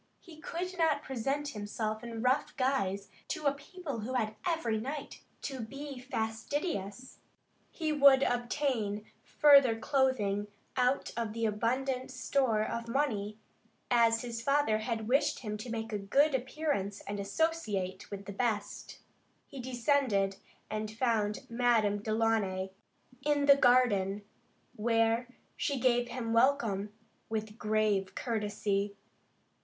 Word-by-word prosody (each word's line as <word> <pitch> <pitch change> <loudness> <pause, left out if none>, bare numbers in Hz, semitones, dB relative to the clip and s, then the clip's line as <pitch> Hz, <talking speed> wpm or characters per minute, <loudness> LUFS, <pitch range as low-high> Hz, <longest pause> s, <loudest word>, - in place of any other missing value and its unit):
He 335 -4 -14
could 360 +4 -4
not 310 -3 +2
present 275 +3 -2
himself 215 0 -4
in 230 -1 -5
rough 255 +3 +1
guise 200 -7 0 0.2
to 305 - -4
a 280 - +4
people 285 -2 -7
who 230 +5 -4
had 220 -3 0
every 280 -11 0
right 280 +6 -6 0.2
to 270 -2 -4
be 275 +4 -6
fastidious. 230 - -3 0.5
He 315 -3 -2
would 280 -2 +7
also 245 0 +1
obtain 235 -6 -1 0.2
further 275 -6 +6
clothing 225 -6 +1 0.3
out 255 +1 +1
of 230 -2 -2
the 230 0 -1
abundant 250 +4 -1
store 255 -3 +1
of 235 +1 -4
money, 220 -6 -1 0.5
as 230 -1 +4
his 230 -1 -4
father 275 -4 +2
had 220 -1 -3
wished 270 +4 +2
him 210 -3 -4
to 215 +4 -7
make 225 -1 -4
a 210 - -1
good 275 +10 +3
appearance 260 -6 -2
and 205 0 -5
associate 200 - -1
with 200 -1 -7
the 200 - -6
best. 205 -2 -3 0.4
He 275 - -10
descended, 245 -6 +1 0.3
and 215 0 -3
found 220 -2 0
Madame 230 -4 +2
Delaunay 215 -4 0 0.5
in 290 -1 +2
the 280 -1 +8
garden, 210 -7 +3 0.5
where 225 +1 +2 0.3
she 280 -2 -1
gave 245 -1 +3
him 235 -2 -3
welcome, 230 -5 +2 0.4
with 220 0 -4
grave 210 -2 +1
courtesy. 205 -3 -1
230 Hz, 130 wpm, -31 LUFS, 210-270 Hz, 0.5 s, the